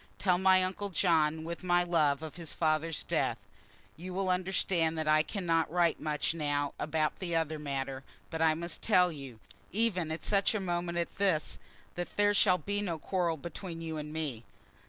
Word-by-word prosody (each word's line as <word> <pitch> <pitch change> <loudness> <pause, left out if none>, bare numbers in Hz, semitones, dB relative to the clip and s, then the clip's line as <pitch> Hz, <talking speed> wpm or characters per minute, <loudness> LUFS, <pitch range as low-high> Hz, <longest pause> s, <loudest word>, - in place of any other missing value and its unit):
Tell 180 -3 +2
my 190 0 +5
uncle 190 +2 -3
John, 160 -4 +2
with 170 +2 -6
my 175 -1 +3
love, 155 -4 +2
of 155 - -7
his 165 -3 -4
father's 155 0 0
death. - - 0 0.6
You 180 +2 -7
will 190 -1 +1
understand 180 -3 +1
that 155 -1 -2
I 155 0 +5
cannot 165 -2 0
write 170 -1 +2
much 150 +1 -1
now 145 -3 -1
about 155 0 0
that 175 -3 -3
other 160 -1 -3
matter; 135 -2 -3 0.3
but 160 -1 -3
I 160 -1 +4
must 170 0 -4
tell 180 -5 +4
you, 135 -7 -9 0.3
even 185 -6 0
at 160 - -5
such 200 +1 +2
a - - +1
moment 175 -2 -2
as 170 - -1
this, 185 -6 0 0.3
that 175 0 -6
there 205 0 +4
shall 190 -2 +5
be 205 +2 -2
no 175 -5 -2
quarrel 170 0 -1
between 170 +2 -7
you 160 -1 -4
and 150 0 -5
me. 150 -8 -4
165 Hz, 185 wpm, -31 LUFS, 155-185 Hz, 0.6 s, my